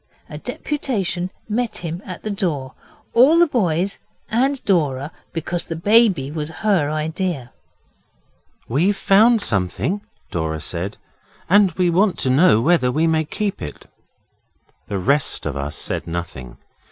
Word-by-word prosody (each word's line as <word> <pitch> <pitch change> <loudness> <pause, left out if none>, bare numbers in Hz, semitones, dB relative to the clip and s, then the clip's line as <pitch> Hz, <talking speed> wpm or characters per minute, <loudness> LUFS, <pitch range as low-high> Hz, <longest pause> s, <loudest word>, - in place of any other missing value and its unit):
A - - -8
deputation 195 - -3 0.2
met 230 +2 -2
him 170 +1 -5
at 180 -2 -7
the 215 - -2
door 155 -10 -2 0.4
all 270 +8 +6
the 345 - +6
boys 195 - 0 0.3
and 265 +5 +1
Dora, 150 -6 +1 0.2
because 170 +1 -3
the 165 - -5
baby 190 - +3
was 150 -1 -4 0.2
her 185 -9 +3
idea. 155 -3 -3 1.2
'We've 175 - +1
found 220 +2 +4
something,' 100 - -1 0.3
Dora 80 -2 -2
said, 90 +6 -3 0.5
'and 200 +1 +5
we 180 0 +1
want 190 +3 +2
to 130 - 0
know 130 -5 +5
whether 140 -3 +3
we 155 +5 +1
may 160 -1 +2
keep 205 +5 -3
it.' 75 - -7 1.0
The 100 - -2
rest 140 +10 +1
of 75 -3 -3
us 70 +1 -3
said - - -1
nothing. 85 -7 -6
170 Hz, 140 wpm, -21 LUFS, 130-200 Hz, 1.2 s, all